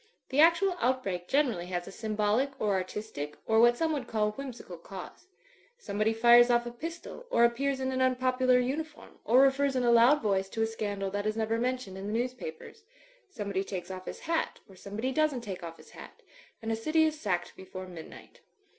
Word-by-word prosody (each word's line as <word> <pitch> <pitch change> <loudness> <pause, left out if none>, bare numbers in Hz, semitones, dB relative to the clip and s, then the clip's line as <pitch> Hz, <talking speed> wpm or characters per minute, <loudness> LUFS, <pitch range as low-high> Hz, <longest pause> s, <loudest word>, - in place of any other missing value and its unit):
The 265 - 0
actual 340 +4 +5
outbreak 200 -9 -1
generally 250 -11 +1
has 175 -1 -3
a - - -7
symbolic 215 +6 -1
or 210 -2 +1
artistic, 185 -6 -4
or, 220 0 +3
what 240 +1 +5
some 320 +2 +1
would 270 -5 -3
call 210 -1 0
whimsical 240 -8 -8
cause. 190 - -10 0.5
Somebody 215 - -1
fires 240 +2 +6
off 240 0 +3
a 240 - -5
pistol 335 - -8
or 235 - +5
ap 235 0 +1
pears 275 +1 -1
in 260 0 -1
an 260 0 -1
unpopular 255 0 +3
uniform, 300 +5 -4
or 245 +4 +5
refers 275 0 +3
in 255 - +1
a 240 - +4
loud 240 +5 +6
voice 195 -2 +1
to 225 +2 -1
a - - +3
scandal 205 -3 -3
that 205 +1 -2
is 215 +1 -1
never 225 +1 0
mentioned 245 -6 -2
in 195 - -6
the 210 - -3
news 245 +2 0
papers; 250 - -9 0.5
somebody 200 - -3
takes 185 -2 -6
off 185 0 -7
his - - -7
hat, 330 0 -1
or 195 - -16
somebody 210 +7 -4
doesn't 305 -3 +1
take 195 -5 -6
off 165 -1 -8
his - - -17
hat; - - -13 0.4
and 225 - -2
a - - +1
city 310 +8 +2
is 310 -1 0
sacked 180 -4 -2
before 185 0 -8
midnight. 175 -3 -12
235 Hz, 205 wpm, -29 LUFS, 200-265 Hz, 0.5 s, fires